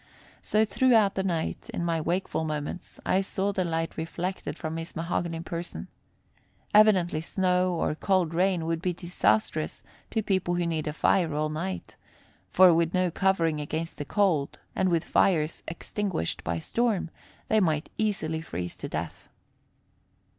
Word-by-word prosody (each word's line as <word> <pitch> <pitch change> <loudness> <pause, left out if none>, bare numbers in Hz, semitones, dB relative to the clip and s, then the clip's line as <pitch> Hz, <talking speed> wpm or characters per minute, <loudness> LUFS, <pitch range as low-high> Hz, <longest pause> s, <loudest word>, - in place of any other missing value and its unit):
So 215 +1 +2
throughout 220 -3 +4
the 190 - -1
night, 170 -4 -2
in 170 - -2
my 165 -1 0
wakeful 170 0 -1
moments, 150 +2 -5
I 190 - +3
saw 195 +1 -1
the 185 - 0
light 165 -1 -2
reflected 165 -1 -4
from 160 +1 -4
his 165 0 -6
mahogany 165 0 -2
person. 170 +1 -6 0.8
Evidently 190 -7 +5
snow 180 +1 +1
or 165 - 0
cold 180 0 +1
rain 180 -1 +2
would 165 0 -1
be 180 0 0
disastrous 155 - 0 0.3
to 220 - -1
people 185 -3 +1
who 175 0 0
need 160 -2 -1
a 150 - -2
fire 165 0 +2
all 155 +1 0
night; 170 +5 -5 0.5
for, 185 -2 +7
with 165 +2 +1
no 185 -1 +2
covering 165 -5 +1
against 160 +3 -4
the - - -1
cold 175 -7 +1 0.2
and 190 0 +2
with 170 -2 +2
fires 165 -5 +2
extinguished 180 - -3
by 85 0 -1
storm, 210 - 0 0.4
they 220 - +3
might 160 -5 0
easily 195 -7 0
freeze 90 - -5
to - - -6
death. 80 +2 -5
170 Hz, 155 wpm, -27 LUFS, 160-190 Hz, 0.8 s, for